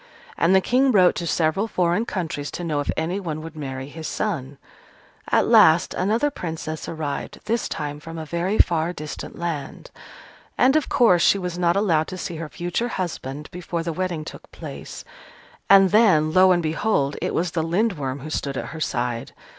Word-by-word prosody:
And 175 +3 +3
the 190 - +5
King 260 +5 +3
wrote 185 -5 +5
to 170 - -3
several 165 +7 +1
foreign 180 +2 +1
countries, 160 -6 -3
to 175 - -5
know 155 -4 -1
if 145 - -3
anyone 160 -1 -3
would 165 0 -9
marry 135 -3 -5
his 160 +2 -7
son. 145 -10 -3 0.7
At - - +3
last 165 +3 +5
another 225 +10 +1
Princess 160 - -5
arrived, 155 -3 -4
this 225 +2 -1
time 150 -1 -4
from 165 +2 -9
a 160 - -5
very 170 +6 -1
far 170 0 +2
distant 150 -3 -7
land. 160 -5 -5 0.7
And, 265 +3 +4
of 310 - +1
course, 185 -9 +4
she 200 - +5
was 180 -2 -4
not 175 -1 +2
allowed 170 -6 +2
to 185 - -6
see 170 -2 -5
her 160 -1 -6
future 175 +8 -2
husband 150 - -4
before 175 -1 -4
the 165 0 -3
wedding 175 -3 -3
took - - -10
place, - - -9 0.6
and 195 -2 +7
then, 180 -9 +4
lo 185 0 +6
and 175 -1 +2
behold! 155 -3 0
it - - -2
was 175 0 0
the 165 - -1
Lindworm 165 - -1
who 155 +3 -7
stood 140 -3 -2
at - - -4
her 160 - -7
side. 120 -4 -2
170 Hz, 185 wpm, -23 LUFS, 155-185 Hz, 0.7 s, and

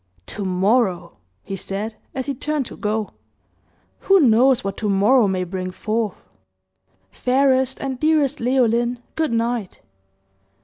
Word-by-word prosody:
"To 210 - -6
morrow," 185 -1 0 0.3
he 195 - -5
said, 200 +4 -4 0.2
as 260 -1 -3
he 280 - -2
turned 290 +1 -2
to - - -9
go. 210 -1 -2 0.9
"Who 390 0 +4
knows 255 -1 +4
what 195 0 -3
to 215 - -2
morrow 210 +4 +4
may 185 -1 -1
bring 185 +1 -4
forth! 215 +2 -2 1.0
Fairest 260 0 +1
and 265 -2 -4
dearest 305 -2 +2
Leoline, 240 -1 +1 0.2
good 315 -5 -1
night!" 230 -3 -2
235 Hz, 130 wpm, -21 LUFS, 200-265 Hz, 1.0 s, Who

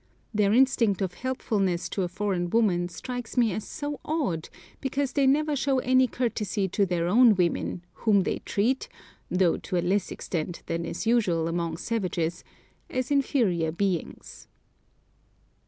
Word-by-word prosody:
Their 205 -1 +3
instinct 230 -5 +3
of 180 -2 -2
helpfulness 200 -7 -1
to 195 - -2
a 180 - 0
foreign 185 -2 -2
woman 180 -5 +2
strikes 245 +7 -6
me 230 -5 +3
as 215 +2 -5
so 290 -1 -5
odd, 255 - -2 0.3
because 270 -1 -2
they 280 -2 +3
never 300 +2 +2
show 270 0 +1
any 255 0 +3
courtesy 210 -5 -1
to 200 +2 +1
their 170 -1 0
own 230 +3 +6
women, 175 0 -1
whom 210 -3 +3
they - - -1
treat 260 - 0 0.4
(though 180 -2 +2
to 185 - -3
a - - +2
less 195 +3 +1
extent 170 0 -4
than 165 0 -2
is 170 - -4
usual 195 -9 +2
among 165 -1 -2
savages) 180 -5 -2 0.5
as 255 +1 -2
inferior 220 - +2
beings. 180 0 -3
205 Hz, 150 wpm, -27 LUFS, 175-255 Hz, 0.5 s, own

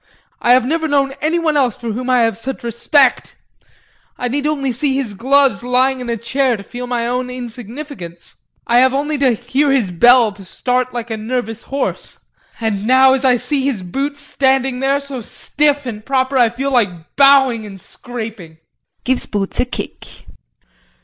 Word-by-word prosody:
I 240 - +5
have 255 -1 +4
never 320 +4 0
known 280 -2 +1
anyone 320 0 +1
else 255 -6 +2
for 235 -2 -5
whom 250 +4 -4
I 250 -1 +4
have 225 -2 +1
such 265 +4 -5
respect. 245 +3 +2 0.8
I 245 - -2
need 285 +3 -1
only 280 -3 -1
to - - -5
see 275 -2 +1
his 260 -6 -2
gloves 260 0 +2
lying 255 +2 +1
in 250 -1 -6
a 230 - -1
chair 245 +2 0
to 200 - -10
feel 245 +4 -7
my 240 -1 -1
own 250 +1 -2
insignificance. 240 - -8 0.3
I 240 +1 +4
have 260 +1 +4
only 295 +1 -1
to 265 -3 +3
hear 260 +5 0
his 240 -9 +1
bell 240 +5 +5
to 200 -1 -13
start 250 +6 -1
like 235 -1 -5
a 220 - -2
nervous 225 0 -3
horse 275 +1 -4 0.4
and 215 -2 -2
now 260 +1 +6
as 265 0 -1
I 255 -2 +4
see 275 +3 -1
his 240 -9 -1
boots 275 +10 -3
standing 265 -2 0
there 275 +1 +1
so 280 -3 -7
stiff 290 +5 -1
and 215 -4 -6
proper 265 +1 0
I 240 -3 +4
feel 265 +4 -3
like 185 -10 -1
bowing 270 -5 +5
and 195 -2 -11
scraping. 220 -7 -9 0.5
[Gives 260 0 +1
boots 200 -2 -3
a - - +3
kick]. 250 - -8
250 Hz, 185 wpm, -17 LUFS, 230-275 Hz, 0.8 s, now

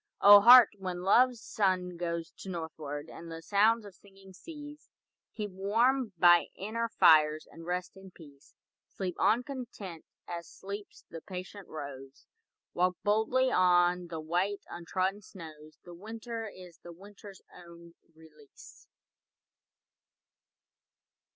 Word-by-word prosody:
O 205 0 +9
Heart, 240 +1 +9
when 180 -2 -5
Love's 245 +5 +3
sun 185 -3 -1
goes 170 -1 -4
To 195 - -9
northward, 155 -4 -6
and 165 0 -11
the 165 - -7
sounds 215 +4 +2
of 200 - -12
singing 195 0 -18
cease, 295 - -12 0.5
Keep 210 -3 -5
warm 225 +6 +1
by 175 0 +5
inner 230 +4 -4
fires, 155 -6 +4
and 165 0 -12
rest 180 +1 -4
in 190 0 -13
peace. 145 -5 -18 0.3
Sleep 185 -2 -5
on 220 +5 +2
content, 225 - -8 0.2
as 170 -1 -7
sleeps 200 +1 -10
the 165 - -8
patient 185 +1 -9
rose. 135 -2 -10 0.5
Walk 180 0 0
boldly 220 +5 +1
on 180 -1 +3
the 165 -1 -6
white 180 +6 -2
untrodden 185 +4 -3
snows, 155 -5 -13
The 175 - -12
winter 225 +4 -7
is 180 -4 -13
the 175 - -12
winter's 200 +2 -14
own 170 -1 -15 0.2
release. 155 -3 -18
185 Hz, 125 wpm, -30 LUFS, 170-210 Hz, 0.5 s, O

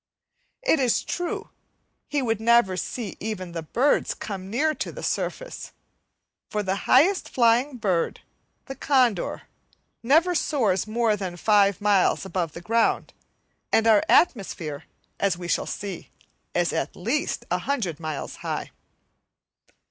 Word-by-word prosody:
It - - +3
is 250 -4 +2
true, 350 0 -4 0.6
he 290 -2 -1
would 225 -3 -1
never 235 -4 +4
see 210 +2 -5
even 195 -5 -5
the 170 -1 -4
birds 245 - +1
come 190 -2 -6
near 300 +9 +1
to - - -4
the - - -9
surface, - - -4 0.8
for 210 -1 -2
the 190 0 0
highest 350 +10 +4
flying 250 +3 +2
bird, 190 -7 -1 0.4
the 270 - -6
condor, 255 -9 +1 0.6
never 320 +9 +4
soars 225 - +1
more 225 0 +1
than 185 -3 -5
five 200 0 +3
miles 205 -2 +3
from 185 -2 -2
the 165 +2 -10
ground, 230 +5 +1 0.6
and 225 - +3
our 220 -2 +6
atmosphere, 170 - +1 0.3
as 195 -3 +1
we 175 -1 -6
shall - - 0
see, 200 -4 -6 0.5
is 175 -1 +1
at - - -2
least 240 +11 -2
100 180 - -1
miles 155 -3 -5
high. - - -4
215 Hz, 135 wpm, -25 LUFS, 185-255 Hz, 0.8 s, our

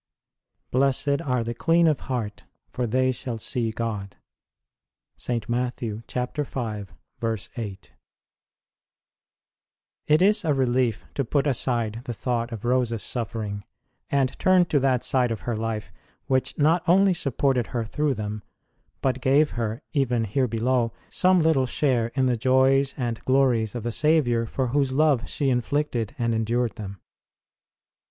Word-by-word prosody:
Blessed 140 +3 +2
are 125 -5 0
the 115 +1 -3
clean 165 +8 +3
of 155 -4 +3
heart, 115 -6 -4 0.3
for 125 -1 -2
they 130 +3 +2
shall 125 -2 -5
see 115 +1 -2
God. 110 -4 -4 1.0
St. 115 -3 -3
Matt. 125 +1 -1
v. 110 -2 -4
8. 115 -4 -5 2.2
|]T 155 +5 +5
is 210 0 +3
a 155 -3 +2
relief 125 -3 +1
to 140 - 0
put 140 +3 0
aside 120 -4 -1
the 120 - -3
thought 120 +1 -2
of 115 -1 -6
Rose 125 -1 +2
s 115 -3 -3
suffering 105 -3 -4 0.5
and 135 -2 0
turn 185 -1 +5
to 155 -4 +1
that 130 -2 +1
side 125 -2 +2
of 110 -5 -3
her 120 - -2
life 110 -3 -4 0.3
which 130 -1 0
not 160 +4 +3
only 190 +2 +5
supported 135 -5 0
her 115 -2 -2
through 150 +4 0
them, 105 -1 -4 0.6
but 130 -1 0
gave 145 +4 +3
her, 115 +2 -3
even 125 -5 +1
here 125 +5 0
below, 115 +1 +1 0.2
some 185 -2 +3
little 145 -5 +3
share 125 -3 +1
in 130 -2 +2
the 125 -1 +2
joys 130 +3 +3
and 120 -4 -3
glories 125 -4 +2
of 120 - -4
the 120 - -2
Saviour 125 -5 +2
for 130 +2 -2
Whose 135 0 +1
love 140 -2 +2
she 140 -3 0
inflicted 125 -2 -1
and 115 -2 0
endured 115 +1 0
them. 100 -3 -7
125 Hz, 145 wpm, -25 LUFS, 115-135 Hz, 2.2 s, |]T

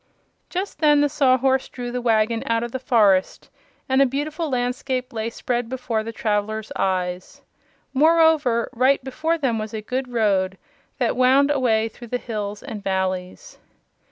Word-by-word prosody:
Just 380 +3 -4
then 295 -2 +4
the 290 - +2
Sawhorse 265 -2 +2
drew 245 -1 -6
the 250 0 -3
wagon 225 -1 +1
out 230 0 +1
of 235 - -5
the 260 - -4
forest 210 -7 +2 0.4
and 265 +1 +3
a - - +6
beautiful 300 +5 -3
landscape 255 0 -2
lay 220 0 -2
spread 240 0 -3
before 250 -3 -2
the 225 +1 -6
travelers' 215 -1 -2
eyes. 185 -1 -2 0.5
Moreover, 310 -5 +3
right 260 +2 +2
before 310 +6 -1
them 255 -7 0
was 215 +1 -5
a 215 - -4
good 255 +4 -3
road 195 -5 +1 0.4
that 245 -4 0
wound 265 +3 +4
away 230 -6 +2
through 235 +2 -12
the 250 - -2
hills 210 -4 -5
and 220 -7 -7
valleys. 190 - -3
245 Hz, 155 wpm, -22 LUFS, 220-270 Hz, 0.5 s, a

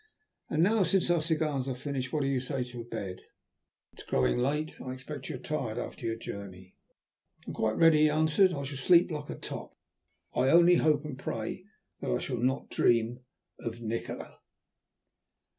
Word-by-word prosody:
And 155 +2 +2
now, 215 +3 +3
since 185 -1 +3
our 170 -2 +3
cigars 155 -4 0
are 130 - -2
finished, 130 -1 -4
what 150 -2 0
do - - 0
you 135 -2 +1
say 130 0 -2
to 120 -1 -7
bed? 100 -6 -6 0.7
It - - -16
is - - -4
growing 65 - +1
late, 150 +5 -1
and 130 - -7
I - - -3
expect 135 +1 -7
you - - -3
are - - -5
tired 130 -8 -3
after 115 - -5
your 115 - -1
journey." 95 -4 -9 0.7
"I - - -7
am - - -7
quite 110 0 0
ready," 165 -2 +6
he 155 0 +5
answered. 155 +5 +4
"I 140 -5 -3
shall 140 0 -5
sleep 170 +6 +5
like 150 -2 -5
a - - -4
top. - - -7 0.6
I 130 +1 +2
only 175 +2 +7
hope 150 -1 +2
and 135 -4 -6
pray 115 +12 -4 0.3
that - - -4
I - - +2
shall 125 - -3
not 130 +3 -1
dream 120 +1 +2 0.4
of 115 0 -5
Nikola." 115 0 -5
135 Hz, 190 wpm, -30 LUFS, 120-155 Hz, 0.7 s, only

